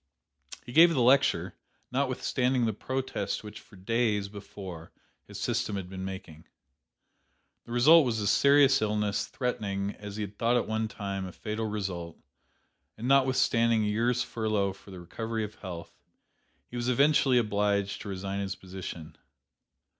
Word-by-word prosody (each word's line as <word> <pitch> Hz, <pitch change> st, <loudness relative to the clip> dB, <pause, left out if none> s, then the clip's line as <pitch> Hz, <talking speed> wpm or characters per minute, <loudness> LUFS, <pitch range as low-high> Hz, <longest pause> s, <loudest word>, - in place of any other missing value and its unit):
"He -, -, -8 dB
gave 170 Hz, +6 st, +7 dB
the 130 Hz, -, +2 dB
lecture, 135 Hz, +3 st, +3 dB, 0.4 s
notwithstanding 130 Hz, -1 st, 0 dB
the 110 Hz, -, 0 dB
protest 130 Hz, -2 st, -3 dB
which 105 Hz, 0 st, -9 dB
for -, -, -18 dB
days 105 Hz, 0 st, 0 dB
before 95 Hz, -4 st, -9 dB, 0.4 s
his -, -, -8 dB
system 105 Hz, -, -1 dB
had 95 Hz, -2 st, -5 dB
been 95 Hz, 0 st, -6 dB
making. 95 Hz, -5 st, -8 dB, 1.2 s
The -, -, -11 dB
result 150 Hz, +7 st, +7 dB
was 120 Hz, -4 st, -1 dB
a 105 Hz, -, -2 dB
serious 140 Hz, +6 st, +5 dB
illness, 105 Hz, -1 st, 0 dB
threatening, 100 Hz, -6 st, -2 dB
as 105 Hz, -1 st, -7 dB
he 105 Hz, 0 st, -2 dB
thought 115 Hz, +5 st, 0 dB
at 120 Hz, -, -1 dB
one 110 Hz, 0 st, -1 dB
time, 100 Hz, -3 st, -4 dB
a -, -, -8 dB
fatal 110 Hz, +4 st, -4 dB
result; 95 Hz, -6 st, -4 dB, 0.8 s
and 115 Hz, +3 st, -4 dB
notwithstanding 130 Hz, -4 st, +3 dB
a 105 Hz, -, 0 dB
year's 120 Hz, +3 st, +1 dB
furlough 105 Hz, -4 st, -1 dB
for 95 Hz, -, -17 dB
the 95 Hz, -2 st, -9 dB
recovery 110 Hz, +5 st, -4 dB
of 105 Hz, 0 st, -6 dB
health, 90 Hz, -4 st, -8 dB, 0.7 s
he -, -, -12 dB
was 120 Hz, +1 st, -1 dB
eventually 140 Hz, 0 st, +4 dB
obliged 100 Hz, -3 st, 0 dB
to 105 Hz, -, -7 dB
resign 95 Hz, +1 st, -4 dB
his 100 Hz, 0 st, -3 dB
position. 90 Hz, -4 st, -8 dB
105 Hz, 150 wpm, -29 LUFS, 100-125 Hz, 1.2 s, gave